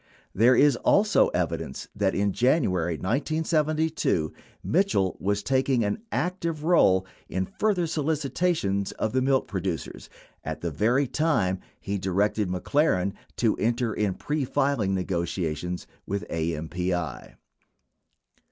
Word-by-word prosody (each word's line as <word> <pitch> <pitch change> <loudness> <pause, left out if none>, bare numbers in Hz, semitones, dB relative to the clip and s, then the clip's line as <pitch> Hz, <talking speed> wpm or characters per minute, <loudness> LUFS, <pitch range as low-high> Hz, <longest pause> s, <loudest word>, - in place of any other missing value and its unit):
There 120 +5 +5
is 140 -1 +5
also 210 - +4
evidence 85 -5 -3
that 100 -2 +1
in 100 0 +1
J 130 +6 +3
anuary 90 - -1
1972, 155 - 0 0.3
.Mitchell 175 - +1
was 100 +1 -1
taking 130 -2 +2
an 105 - -2
active 170 -4 -2
role 95 - +4 0.2
in 95 0 -1
further 195 - 0
solicitations 150 - 0
of 110 - -2
the 130 - +2
milk 135 0 +2
producers 90 - -4 0.3
at - - -5
the 85 - -2
very 120 - +2
time 125 - +1 0.2
he 100 0 -3
directed 100 +2 0
McLaren 95 - +1 0.2
to 115 -3 +2
enter 115 0 0
into 100 -3 -1
pre 150 -1 -2
filing 130 -7 +1
negotia 85 -3 -1
tions 90 +3 -5 0.2
with 100 -3 -3
AMPI. 85 +2 -3
105 Hz, 125 wpm, -26 LUFS, 90-150 Hz, 0.3 s, There